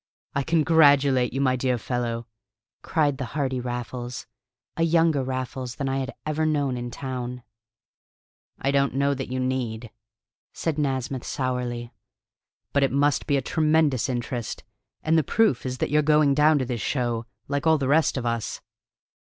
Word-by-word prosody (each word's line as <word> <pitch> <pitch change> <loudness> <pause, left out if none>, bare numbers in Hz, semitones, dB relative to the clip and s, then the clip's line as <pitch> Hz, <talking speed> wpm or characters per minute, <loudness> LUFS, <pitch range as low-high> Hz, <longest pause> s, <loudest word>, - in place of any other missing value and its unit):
"I 140 - +1
congratulate 145 -5 +4
you, 135 - -2
my 130 -2 +3
dear 125 0 0
fellow!" 120 -1 -3 0.6
cried 145 -4 0
the 130 - -2
hearty 130 -3 0
Raffles 120 0 -5 0.5
a - - -3
younger 165 -3 +3
Raffles 130 -1 -4
than 140 - -3
I 135 0 0
had 135 0 -3
ever 155 +1 -1
known 145 -4 +1
in 120 0 -4
town. 125 -1 -5 1.2
"I 135 - 0
don't 140 -2 +1
know 140 +1 +2
that 135 -1 -4
you 130 - -1
need," 125 -3 -2 0.6
said 160 -3 -2
Nasmyth 135 -2 -1
sourly. 125 -2 -3 0.8
"But 140 - +3
it 135 - +2
must 145 +1 +1
be 140 - +3
a 135 - -1
tremendous 155 -4 +2
interest. 120 -2 -3 0.4
And 160 +1 +3
the - - +1
proof 150 - +2
is 130 0 -3
that - - -2
you're 150 +1 +4
going 150 -1 +4
down 150 +2 +4
to 130 - 0
this 120 -3 -3
show, 120 -4 -1 0.2
like 140 +2 -1
all 160 0 +5
the 135 -3 -1
rest 150 +1 +3
of 125 - -3
us." 115 -2 -2
135 Hz, 165 wpm, -25 LUFS, 125-145 Hz, 1.2 s, all